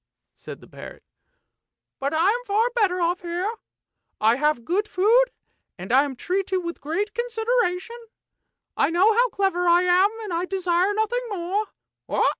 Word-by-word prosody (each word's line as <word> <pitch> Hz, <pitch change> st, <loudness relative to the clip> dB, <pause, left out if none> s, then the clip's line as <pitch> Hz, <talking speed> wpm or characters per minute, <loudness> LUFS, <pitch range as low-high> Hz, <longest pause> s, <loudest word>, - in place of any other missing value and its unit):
" -, -, -59 dB
said -, -, -11 dB
the -, -, -15 dB
parrot; -, -, -11 dB, 0.5 s
" -, -, -63 dB
but 275 Hz, +1 st, -1 dB
I'm 390 Hz, +10 st, +1 dB
far 440 Hz, +4 st, +1 dB
better 405 Hz, -7 st, +1 dB
off 350 Hz, +1 st, 0 dB
here; 355 Hz, +5 st, -3 dB, 0.7 s
I 225 Hz, +3 st, +3 dB
have 295 Hz, -5 st, 0 dB
good 400 Hz, +7 st, 0 dB
food, 445 Hz, +7 st, +4 dB, 0.5 s
and 185 Hz, +5 st, -7 dB
I 270 Hz, +3 st, +5 dB
am 275 Hz, -2 st, -6 dB
treated 375 Hz, +6 st, -1 dB
with 340 Hz, 0 st, -6 dB
great 395 Hz, +8 st, -2 dB
consideration. 465 Hz, -1 st, -2 dB, 0.7 s
I -, -, +2 dB
know 370 Hz, +6 st, +4 dB
how 485 Hz, +3 st, +3 dB
clever 385 Hz, -4 st, 0 dB
I 345 Hz, +1 st, +5 dB
am, 365 Hz, +2 st, +4 dB
and 405 Hz, -5 st, -5 dB
I 340 Hz, +2 st, -1 dB
desire 370 Hz, 0 st, 0 dB
nothing 475 Hz, +3 st, -1 dB
more. 395 Hz, +2 st, -2 dB
375 Hz, 160 wpm, -23 LUFS, 340-435 Hz, 0.7 s, I